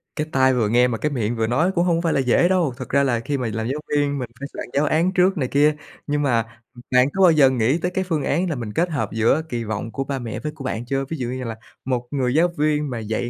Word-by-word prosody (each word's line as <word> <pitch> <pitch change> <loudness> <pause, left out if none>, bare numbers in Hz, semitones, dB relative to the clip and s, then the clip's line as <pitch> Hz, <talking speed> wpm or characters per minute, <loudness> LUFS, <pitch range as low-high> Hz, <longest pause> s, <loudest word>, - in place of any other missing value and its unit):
Cái 155 0 -2
tai 130 -1 +3
vừa 115 -4 +1
nghe 125 +2 +4
mà 115 - -2
cái 150 +6 -1
miệng 120 -3 -1
vừa 110 -1 0
nói 155 +11 +2
cũng 175 0 +2
hông 170 -2 +2
phải 165 - 0
là - - +1
dễ 130 +6 +3
đâu. 175 -8 +1
Thật 130 - -7
ra 140 +1 +3
là 120 -4 +1
khi 140 +5 -2
mà 125 - -2
làm 110 +1 -2
giáo 140 +4 -2
viên, 145 -1 0
mình 125 -2 -5
phải 140 - -5
soạn - - -6
giáo 145 +2 +2
án 165 +5 +2
trước 185 0 +3
này 130 - 0
kia. 145 +3 +3 0.3
Nhưng 145 0 0
mà, 115 -4 -1
ừm, 120 - -13
bạn 125 0 +5
có 195 - 0
bao 175 - +7
giờ 145 -4 +5
nghĩ 130 +3 +1
tới 180 +1 -2
cái 190 +1 -1
phương 160 -6 -2
án 175 +7 0
là 160 - -1
mình 115 -5 -5
kết 175 +2 +1
hợp 150 -4 -2
giữa 115 +7 +2
kỳ 120 -1 -3
vọng 110 +1 -4
của 135 +5 -3
ba 135 0 -4
mẹ 115 -3 -5
với 150 - -4
của 150 -3 -11
bạn 120 -2 -3
chưa? 135 +2 -1
Ví 160 - -3
dụ 125 - -3
như 130 +1 -4
là 115 -2 -5 0.3
một 125 -2 -2
người 130 -3 0
giáo 165 +4 +4
viên 150 0 +1
mà 120 -3 -4
dạy 110 +2 -3
135 Hz, 300 wpm, -22 LUFS, 120-150 Hz, 0.3 s, bao